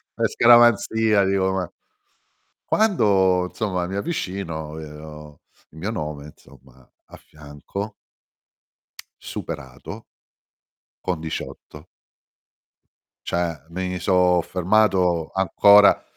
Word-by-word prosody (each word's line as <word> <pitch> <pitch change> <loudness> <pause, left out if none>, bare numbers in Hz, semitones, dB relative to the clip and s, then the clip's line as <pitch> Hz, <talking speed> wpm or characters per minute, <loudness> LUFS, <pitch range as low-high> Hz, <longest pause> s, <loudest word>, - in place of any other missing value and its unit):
per - - 0
scaramanzia 110 -3 +4
dico, 95 -1 +1
ma 95 -3 -3 0.9
quando 95 - +2
insomma 90 -3 -3
mi 95 - -5
avvicino, 90 - -4
vedo 75 -1 -11 0.3
il 80 - -18
mio 100 +6 -3
nome 75 -8 -5
insomma 65 -3 -18 0.2
a - - -14
fianco 80 +8 -8 1.3
superato 65 -2 -8 1.0
con 90 -3 -2
18. 80 -1 -8 1.4
Cioè, 85 -4 -2
mi 90 +1 -4
sò 90 0 +3
fermato 90 -2 +1
ancora, 100 +2 +5
90 Hz, 85 wpm, -22 LUFS, 80-100 Hz, 1.4 s, ancora